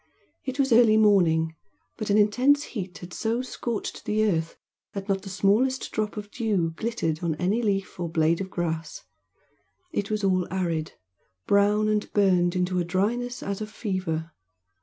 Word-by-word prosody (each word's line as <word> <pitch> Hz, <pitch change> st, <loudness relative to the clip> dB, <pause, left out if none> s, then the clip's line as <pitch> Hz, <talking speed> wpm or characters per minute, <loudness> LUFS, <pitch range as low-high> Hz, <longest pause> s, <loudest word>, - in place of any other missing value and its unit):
It 265 Hz, 0 st, -4 dB
was 270 Hz, -3 st, +3 dB
early 225 Hz, -2 st, +6 dB
morning, 165 Hz, -7 st, +4 dB, 0.4 s
but 215 Hz, -2 st, -5 dB
an 205 Hz, -, +4 dB
intense 250 Hz, +8 st, +4 dB
heat 190 Hz, -, -6 dB
had 175 Hz, 0 st, -10 dB
so 230 Hz, +3 st, -1 dB
scorched 240 Hz, -3 st, -4 dB
the 215 Hz, +1 st, +1 dB
earth 165 Hz, -5 st, -1 dB, 0.4 s
that 195 Hz, -1 st, -5 dB
not 195 Hz, -1 st, 0 dB
the 195 Hz, -, -8 dB
smallest 215 Hz, +7 st, +1 dB
drop 215 Hz, -1 st, -2 dB
of 205 Hz, 0 st, -6 dB
dew 205 Hz, -9 st, 0 dB
glittered 170 Hz, -7 st, -2 dB
on 165 Hz, -3 st, 0 dB
any 190 Hz, +8 st, 0 dB
leaf 195 Hz, -4 st, -1 dB
or 170 Hz, -1 st, -2 dB
blade 165 Hz, +2 st, +2 dB
of 190 Hz, -, -4 dB
grass; 165 Hz, -3 st, -3 dB, 0.9 s
it 200 Hz, -11 st, -2 dB
was 215 Hz, -1 st, -1 dB
all 185 Hz, -2 st, +1 dB
arid, 170 Hz, -4 st, -2 dB, 0.5 s
brown 205 Hz, +1 st, +3 dB
and 210 Hz, -1 st, 0 dB
burned 180 Hz, -4 st, +3 dB
into 180 Hz, 0 st, 0 dB
a -, -, +1 dB
dryness 225 Hz, +8 st, -1 dB
as 200 Hz, +1 st, -3 dB
of 215 Hz, -, -4 dB
fever. 185 Hz, -7 st, -3 dB
200 Hz, 165 wpm, -26 LUFS, 175-215 Hz, 0.9 s, early